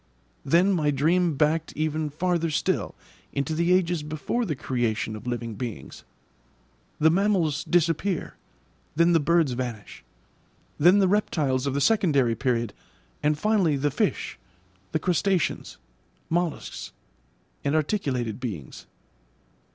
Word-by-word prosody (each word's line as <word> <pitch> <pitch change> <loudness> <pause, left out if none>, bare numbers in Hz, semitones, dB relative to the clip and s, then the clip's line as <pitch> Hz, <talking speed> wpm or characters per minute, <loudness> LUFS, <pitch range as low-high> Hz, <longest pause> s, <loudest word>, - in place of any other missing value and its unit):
Then 175 +7 +3
my 155 -5 +1
dream 160 +4 +2
backed 155 +3 +1
even 155 0 -1
farther 170 +2 0
still 150 - -1 0.4
into 140 +3 -1
the 170 +3 +1
ages 175 -3 +2
before 155 +11 -2
the 155 -7 -2
creation 120 -4 -2
of 110 +3 -9
living 120 -2 -3
beings. 105 - -7 1.0
The 160 +1 +5
mammals 175 -5 +1
disappear, 175 +1 0 0.6
then 170 +2 +4
the 165 - +5
birds 165 -1 +2
vanish, 120 - -5 0.8
then 175 +6 +6
the 195 -2 +4
reptiles 145 -9 +1
of 140 - -1
the 140 - 0
secondary 140 - +3
period, 120 -2 -1 0.5
and 150 0 +1
finally 190 -6 +2
the 145 +2 0
fish, - - -1 0.5
the - - +1
crustaceans, 180 +1 0 0.5
molluscs, 170 -2 -2 0.7
and 140 +2 0
articulated 140 - -1
beings. 100 - -7
155 Hz, 120 wpm, -25 LUFS, 130-175 Hz, 1.0 s, then